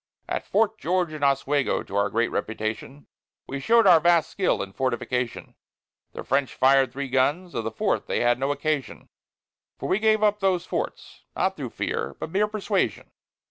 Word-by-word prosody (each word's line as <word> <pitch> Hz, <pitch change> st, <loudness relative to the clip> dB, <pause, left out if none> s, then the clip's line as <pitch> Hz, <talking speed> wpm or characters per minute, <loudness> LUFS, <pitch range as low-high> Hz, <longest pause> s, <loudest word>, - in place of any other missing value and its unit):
At -, -, -3 dB
Fort 220 Hz, +1 st, +1 dB
George 175 Hz, -1 st, 0 dB
and 150 Hz, -2 st, -6 dB
Oswego, 140 Hz, 0 st, +1 dB
to 100 Hz, -, -9 dB
our 100 Hz, 0 st, +2 dB
great 115 Hz, +3 st, 0 dB
reputation, 110 Hz, +6 st, -4 dB, 0.4 s
We 140 Hz, -, -5 dB
show'd 230 Hz, +10 st, +4 dB
our 175 Hz, -4 st, +8 dB
vast 170 Hz, -1 st, +3 dB
skill 190 Hz, -, 0 dB
in 95 Hz, 0 st, -10 dB
fortification; 125 Hz, -1 st, -2 dB, 0.6 s
The -, -, -7 dB
French 135 Hz, 0 st, 0 dB
fired 135 Hz, -1 st, +4 dB
three 140 Hz, +2 st, -4 dB
guns; 145 Hz, +8 st, 0 dB
of 115 Hz, -, -3 dB
the -, -, 0 dB
fourth 110 Hz, -, -1 dB
they -, -, -1 dB
had 120 Hz, 0 st, +2 dB
no 135 Hz, +2 st, 0 dB
occasion; 150 Hz, -1 st, -3 dB, 0.7 s
For -, -, -5 dB
we 195 Hz, -, +1 dB
gave 215 Hz, 0 st, +3 dB
up 210 Hz, 0 st, +3 dB
those 185 Hz, -3 st, +1 dB
forts, -, -, -5 dB
not -, -, 0 dB
through -, -, -5 dB
fear, -, -, -3 dB
but 160 Hz, -, -6 dB
mere 205 Hz, +3 st, +2 dB
persuasion. 205 Hz, -, -2 dB
145 Hz, 180 wpm, -25 LUFS, 130-185 Hz, 0.7 s, our